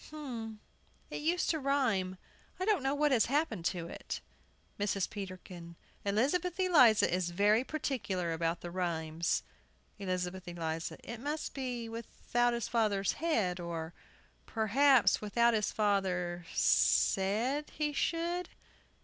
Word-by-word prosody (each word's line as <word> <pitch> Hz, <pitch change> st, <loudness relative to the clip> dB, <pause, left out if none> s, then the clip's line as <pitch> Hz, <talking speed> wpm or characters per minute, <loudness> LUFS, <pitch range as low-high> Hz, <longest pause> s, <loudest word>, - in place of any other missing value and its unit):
But 245 Hz, -8 st, -6 dB, 0.6 s
it -, -, -4 dB
used 340 Hz, +4 st, +1 dB
to 320 Hz, -, -1 dB
rhyme. 240 Hz, -10 st, +1 dB, 0.4 s
I 370 Hz, -, -1 dB
don't 420 Hz, -7 st, +3 dB
know 270 Hz, +2 st, 0 dB
what 295 Hz, 0 st, +2 dB
has 240 Hz, -4 st, +4 dB
happened 250 Hz, -, 0 dB
to 170 Hz, -2 st, -1 dB
it. -, -, -6 dB, 0.6 s
MRS. 200 Hz, -2 st, 0 dB
PETERKIN. 185 Hz, -3 st, -8 dB, 0.3 s
Elizabeth 290 Hz, -, 0 dB
Eliza 275 Hz, -, +5 dB
is 180 Hz, -1 st, 0 dB
very 205 Hz, +6 st, +3 dB
particular 210 Hz, -, -2 dB
about 165 Hz, +1 st, -1 dB
the 175 Hz, -, -6 dB
rhymes. 170 Hz, -2 st, -1 dB, 0.6 s
ELIZABETH 185 Hz, -1 st, -3 dB
ELIZA. 165 Hz, -2 st, -4 dB
It 235 Hz, 0 st, -7 dB
must 295 Hz, +5 st, -3 dB
be 250 Hz, -4 st, -4 dB
"without 235 Hz, +1 st, -1 dB
his 235 Hz, -2 st, -2 dB
father's 210 Hz, -4 st, +1 dB
head," 220 Hz, -, 0 dB
or, 170 Hz, -1 st, -5 dB, 0.5 s
perhaps, 230 Hz, 0 st, +4 dB
"without 235 Hz, +3 st, +3 dB
his 215 Hz, -2 st, +1 dB
father 180 Hz, -4 st, 0 dB
said" 230 Hz, +10 st, +2 dB
he 300 Hz, -1 st, -2 dB
should. 340 Hz, +4 st, -1 dB
215 Hz, 125 wpm, -32 LUFS, 180-275 Hz, 0.6 s, Eliza